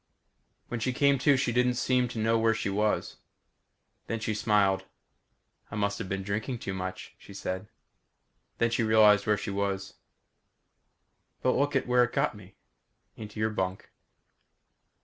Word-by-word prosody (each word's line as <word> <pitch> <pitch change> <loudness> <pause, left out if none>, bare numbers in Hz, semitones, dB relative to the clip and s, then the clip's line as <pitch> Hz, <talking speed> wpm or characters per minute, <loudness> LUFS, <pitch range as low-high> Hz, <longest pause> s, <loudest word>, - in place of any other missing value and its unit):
When 120 - -4
she 130 +3 -1
came 140 +1 +3
to, 140 +1 +4
she 130 - 0
didn't 125 +1 +2
seem 125 0 +1
to 120 - -8
know 115 +1 +2
where 115 0 +3
she 105 -2 -2
was. 105 +2 0 0.9
Then 115 - -2
she 110 0 -2
smiled. 105 -3 +2 0.8
"I - - -7
must 100 -1 -1
have 105 -5 -5
been 95 0 -2
drinking 110 +6 -3
too 100 -3 -5
much," 95 0 -6
she 100 - -13
said. 95 +1 -4 0.9
Then 115 0 +1
she 120 - +1
realized 110 -2 +5
where 105 0 +3
she 100 0 -4
was. 100 -1 -3 1.5
"But 130 - +4
look 145 +1 +1
where 125 0 +4
it 120 - -2
got - - +1
me? 95 -2 -14 0.6
Into 105 0 -9
your 110 0 +1
bunk." 95 -2 -3
110 Hz, 155 wpm, -28 LUFS, 100-120 Hz, 1.5 s, realized